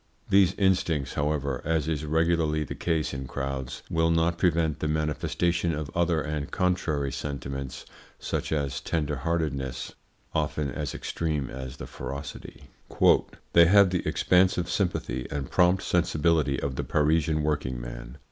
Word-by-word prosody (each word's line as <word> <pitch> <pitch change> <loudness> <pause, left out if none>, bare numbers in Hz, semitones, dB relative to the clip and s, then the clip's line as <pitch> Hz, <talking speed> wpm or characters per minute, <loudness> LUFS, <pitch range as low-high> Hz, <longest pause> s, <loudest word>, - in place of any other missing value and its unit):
These 95 -1 +5
instincts, 90 -7 +1
however 70 -3 -1
as 80 -1 0
is 80 -1 -1
regularly 80 0 +1
the - - -6
case 80 -3 -1
in 65 -1 -5
crowds 70 -1 -4
will 80 0 +1
not 85 +1 +2
prevent 80 -4 +2
the 75 - -1
manifestation 80 +2 0
of 75 -2 -5
other 85 -2 +2
and 75 -2 -3
contrary 80 -6 0
sentiments, 70 -1 -5 0.3
such - - -3
as 70 -3 -1
a - - -19
tenderheartedness 75 -3 -2 0.4
often 75 -3 -1
as 75 +2 -4
extreme 75 -5 -2
as 65 0 -7
the - - -7
ferocity. 70 +1 -7 0.9
"They 85 -1 +8
have 100 0 +6
the 90 - 0
expansive 90 -1 +3
sympathy 65 - -1
and 70 -2 -4
prompt 90 +1 +3
sensibility 80 -4 +2
of 65 -2 -3
the - - -1
Parisian 80 0 +2
working 70 -5 -1
man. - - -8
75 Hz, 140 wpm, -27 LUFS, 70-85 Hz, 0.9 s, They